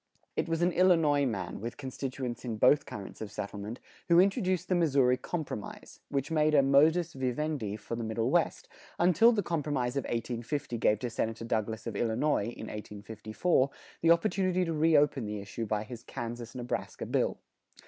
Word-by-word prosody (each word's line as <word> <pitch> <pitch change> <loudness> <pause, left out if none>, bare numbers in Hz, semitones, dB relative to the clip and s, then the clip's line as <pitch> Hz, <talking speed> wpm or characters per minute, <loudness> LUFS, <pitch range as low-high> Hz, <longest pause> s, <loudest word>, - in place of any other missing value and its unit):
It - - -1
was 165 +1 0
an 175 - +3
Illinois 165 -6 +4
man, 95 -6 -4
with 115 +2 -5
constituents 130 -2 -5
in 115 -3 -3
both 130 +6 +4
currents 100 +1 -8
of 110 -1 -5
settlement, 105 +3 -6 0.3
who 170 0 +7
introduced 185 -2 +2
the - - +1
Missouri 140 -7 +3
Compromise, 150 -7 -6
which 140 +2 -2
made 155 -1 +3
a 140 - +6
modus 155 +5 +4
vivendi 130 -3 -2
for 115 - -5
the 115 - -4
Middle 115 +2 -1
West, 175 0 +1 0.3
until 185 +7 +5
the 210 -4 0
Compromise 145 -7 -1
of 140 - -1
1850 120 +3 -3
gave 105 - +3
to 120 +2 -4
Senator 115 0 -2
Douglas 110 -1 -2
of 115 -3 -4
Illinois, 115 +2 +1
in 120 - -6
1854, 110 - -1 0.3
the 165 - +3
opportunity 185 +1 +3
to 165 - -2
reopen 150 -5 +3
the 105 0 -3
issue 100 +3 -5
by 105 0 -1
his 115 +1 -9
Kansas 120 0 -6
Nebraska 125 -1 -4
bill. - - 0
130 Hz, 170 wpm, -30 LUFS, 115-160 Hz, 0.3 s, who